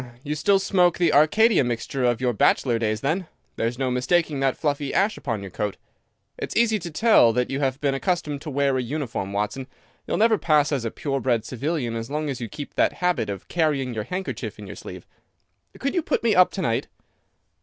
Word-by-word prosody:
Hum! 120 - -13
You 150 - -3
still 195 +7 +3
smoke 180 -3 +2
the 170 -3 +2
Arcadia 210 +6 +5
mixture 120 +2 -3
of 120 -2 +2
your 125 -1 0
bachelor 115 +2 +2
days 110 -1 -1
then! 165 +5 -1 0.3
There's 115 +2 -2
no 130 -1 -1
mistaking 145 +4 +1
that 135 -1 +1
fluffy 145 -2 -1
ash 205 +3 +2
upon 115 -7 -4
your 95 - -8
coat. 105 +1 -3 0.6
It's - - -5
easy 225 -2 +3
to 170 - -6
tell 165 - +5
that 125 +2 0
you 135 - -1
have 135 -1 -1
been 140 -2 +1
accustomed 150 -1 -2
to 155 - -6
wear 140 -1 +1
a - - 0
uniform, 125 -6 -4
Watson. 105 +6 -3 0.4
You'll - - -1
never 220 -1 +4
pass 150 -2 +3
as 135 -5 -1
a - - 0
pure 135 +3 -3
bred 120 -4 0
civilian 130 -1 -2
as 115 0 -5
long 150 0 -2
as 130 - -6
you 115 - -4
keep 145 +7 -8
that - - +2
habit 180 - 0
of 100 -2 -6
carrying 145 -7 0
your 105 -2 -4
handkerchief 185 +6 -5
in - - -9
your - - -8
sleeve. - - -9 0.7
Could 275 - -2
you 350 - +1
put - - -1
me 230 -2 +3
up 185 -2 +6
to 190 - -3
night?" 115 -5 0
140 Hz, 220 wpm, -24 LUFS, 120-170 Hz, 0.7 s, up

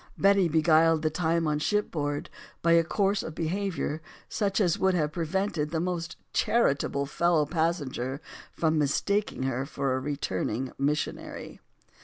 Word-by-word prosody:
Betty 195 -2 +4
beguiled 160 0 +4
the 155 - +1
time 165 0 +1
on 150 -1 0
shipboard 150 -6 -1 0.3
by 170 - +4
a 165 0 +6
course 195 +4 +1
of 160 - -7
be 165 -2 -2
havior 190 -5 -2 0.3
such 200 -1 0
as 180 -5 +2
would 190 -1 +3
have 150 -3 0
prevented 170 -1 -1
the 160 0 -1
most 170 -1 -3 0.2
char 235 -11 +3
itable 140 0 -3
fellow 170 0 +2
passenger 145 -5 -1 0.3
from 160 -1 +1
mistaking 195 +4 0
her 130 0 -1
for 140 -1 -2
a 130 - 0
re 140 +2 -3
turning 120 +3 -2
missionary. 145 +1 -3
160 Hz, 155 wpm, -28 LUFS, 145-180 Hz, 0.3 s, a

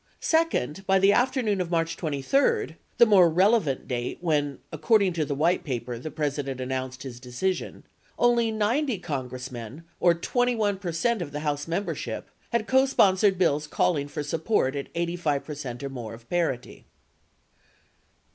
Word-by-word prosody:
Second, 320 - 0
by 195 0 +5
the 195 +1 +5
after 260 +1 +2
noon 205 -4 +1
of 175 - -3
March 165 -1 0
23 270 - 0 0.2
(the 235 - +8
more 190 -6 +6
relevant 180 - +2
date 120 -1 -3
when, 145 -5 0
according 185 +5 +2
to 160 -2 -1
the 140 - -3
White 165 +5 +2
Paper, 125 -3 -4
the 155 - -6
President 145 -3 -3
announced 130 0 -4
his 125 -3 -8
decision), 130 +10 -3 0.3
only 240 -1 +3
90 225 +4 0
Con 140 -8 -4
gressmen, 125 +3 -8 0.2
or 175 -1 +4
21 220 +1 0
percent 185 +5 -1
of 155 -4 -5
the 150 +1 -4
House 145 -1 -2
membership 175 +5 -3 0.2
had 235 -2 0
cosponsored 205 -8 +4
bills 150 -4 +1
calling 150 -2 +1
for 145 - -4
support 155 -2 0
at 140 - -4
85 170 -4 -1
percent 140 -4 -6
or 140 - -3
more 120 -4 -6
of 115 +1 -18
parity. 165 -8 -2
165 Hz, 155 wpm, -26 LUFS, 140-205 Hz, 0.3 s, the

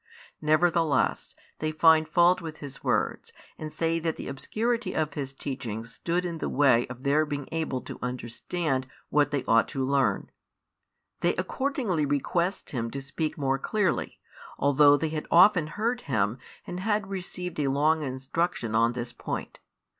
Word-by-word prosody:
Nevertheless 160 0 +2 0.2
they 155 0 -1
find 160 0 +5
fault 175 +3 +4
with 160 -2 -7
His 140 -2 -9
words, - - 0 0.3
and 155 -1 -5
say 165 +1 0
that 160 -1 -1
the - - -7
obscurity 230 - -2
of 155 -2 0
His 135 -2 -4
teaching 130 -5 -5
stood 170 +9 -2
in 170 -2 -4
the - - -2
way 130 -4 +4
of 125 +1 -9
their 145 +2 +3
being 145 -2 -4
able 160 -6 -2
to - - -9
understand 130 +3 -3 0.2
what 145 -2 +3
they 140 -3 -1
ought 115 0 +4
to 135 -3 -2
learn. 130 -7 +1 0.9
They - - +1
accordingly 240 - -1
request 170 +7 -1
Him 115 -3 -2
to 135 - -5
speak 145 +4 -3
more 135 -2 0
clearly, 205 - -1 0.4
although 145 +1 +5
they 160 +1 -1
had 155 -1 -4
often 175 -2 +6
heard 230 +9 -1
Him 110 - 0 0.3
and 180 - -5
had 210 +1 0
received 180 -3 -5
a 145 - +1
long 150 +4 +2
instruction 130 -2 -2
on 115 +2 +3
this 120 0 -5
point. - - -5
150 Hz, 160 wpm, -27 LUFS, 135-170 Hz, 0.9 s, often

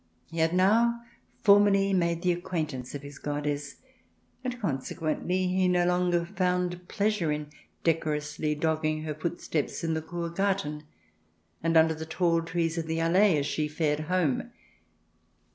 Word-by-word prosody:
He 165 - -4
had 160 0 +3
now 230 +6 +4 0.4
formally 200 -1 +5
made 170 -2 +1
the 180 - +3
acquaintance 155 -8 -3
of 145 - -6
his 145 0 -10
goddess, 145 0 -3 0.7
and, 250 -1 -3
consequently, 165 - -1
he 185 0 +2
no 180 -1 +3
longer 180 -1 +2
found 180 -1 -1
pleasure 205 -6 0
in 150 0 -4 0.3
de 165 - +5
corously 150 -1 -3
dogging 155 -1 0
her 155 -1 -3
footsteps 160 -1 -3
in 165 -1 0
the 160 - -1
Kur 170 +1 -4
Garten, 170 -5 -1 0.8
and 165 0 +2
under 160 0 +5
the 160 0 -7
tall 165 0 +1
trees 165 0 -1
of 160 - -4
the 160 0 -1
Allee 175 +2 +4
as 140 - 0
she 150 +1 -1
fared 150 -1 0
home. 180 -7 +1
165 Hz, 150 wpm, -28 LUFS, 155-180 Hz, 0.8 s, formally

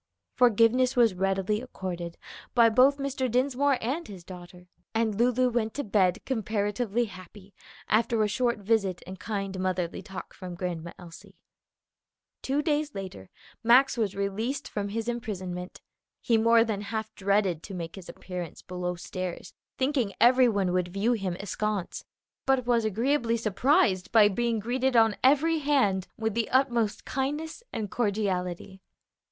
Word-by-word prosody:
Forgiveness 245 +2 +4
was 235 -5 +4
readily 195 +3 0
accorded 180 -8 -6 0.4
by 235 -2 +6
both 255 +5 +5
Mr. 275 -2 -2
Dinsmore 265 +3 +2
and 280 +9 -2
his 190 -4 -10
daughter, 180 0 -11 0.3
and 225 -1 +1
Lulu 245 +3 +2
went 225 -2 -1
to 285 - -2
bed 190 -4 +1
comparatively 220 -1 -1
happy 190 0 -13 0.3
after 225 0 +2
a - - +2
short 235 +3 0
visit 200 -3 0
and 185 0 -9
kind 195 -2 -4
motherly 185 -2 -2
talk 190 -1 -9
from 180 -2 -8
Grandma 170 -2 -4
Elsie. 170 -2 -13 1.1
Two 280 +3 0
days 295 -1 0
later 185 - -7 0.3
Max 250 +4 +5
was 215 -5 -1
released 220 +8 -2
from 205 -1 -3
his 225 +2 -3
imprisonment. 185 -6 -5 0.4
He 235 - +1
more 230 +1 +5
than 215 -3 -3
half 220 +1 -4
dreaded 195 -4 +1
to 195 - -8
make 170 -2 -6
his 190 -3 -11
appearance 180 -3 -7
below 180 -1 -4
stairs, 180 0 -6 0.2
thinking 260 -6 0
every 250 +1 +6
one 195 -4 0
would 180 -1 +1
view 200 +6 0
him 190 -6 -2
askance, 205 -1 -3 0.4
but 265 -2 +2
was 235 -2 +2
agreeably 235 +2 +1
surprised 220 - +2
by 215 -2 +6
being 235 +2 0
greeted 250 +4 0
on 225 -2 +5
every 305 +5 +4
hand 260 -11 +1
with 220 -1 -1
the 230 0 -1
utmost 240 -5 +1
kindness 295 - -3
and 210 -3 -4
cordiality. 190 -4 -2
215 Hz, 145 wpm, -27 LUFS, 190-245 Hz, 1.1 s, by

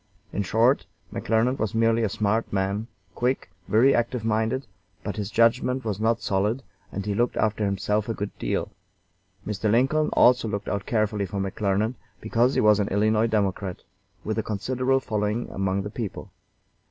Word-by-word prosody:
In - - 0
short, 115 +7 +2 0.3
McClernand 115 +4 +1
was 110 -1 -1
merely 115 0 +3
a 110 - +1
smart 110 +2 0
man, 100 +3 -1 0.3
quick, 125 -6 -1 0.2
very 120 +7 +5
active 120 -1 0
minded, 110 +4 0 0.4
but 100 - -4
his 105 -2 -3
judgment 125 +2 +2
was 105 -3 -2
not 115 +1 +1
solid, 105 +7 0 0.3
and 100 0 -4
he 105 - -1
looked 120 +4 0
after 110 -1 +1
himself 105 +2 0
a 115 - -1
good 100 0 -5
deal. - - -2 0.7
Mr. 105 +1 -1
Lincoln 135 +7 +3
also 125 -2 +5
looked 100 -2 -3
out 100 -1 -3
carefully 105 -3 0
for 100 0 -4
McClernand, 100 +3 0 0.3
because 120 +4 +1
he - - +3
was 105 -1 +5
an 100 - +1
Illinois 110 +3 +2
Democrat, 100 -4 -1 0.4
with - - -2
a - - -1
considerable 130 +5 0
following 105 -1 -1
among 95 0 -1
the 105 - -6
people. 110 -4 -6
110 Hz, 165 wpm, -25 LUFS, 100-115 Hz, 0.7 s, very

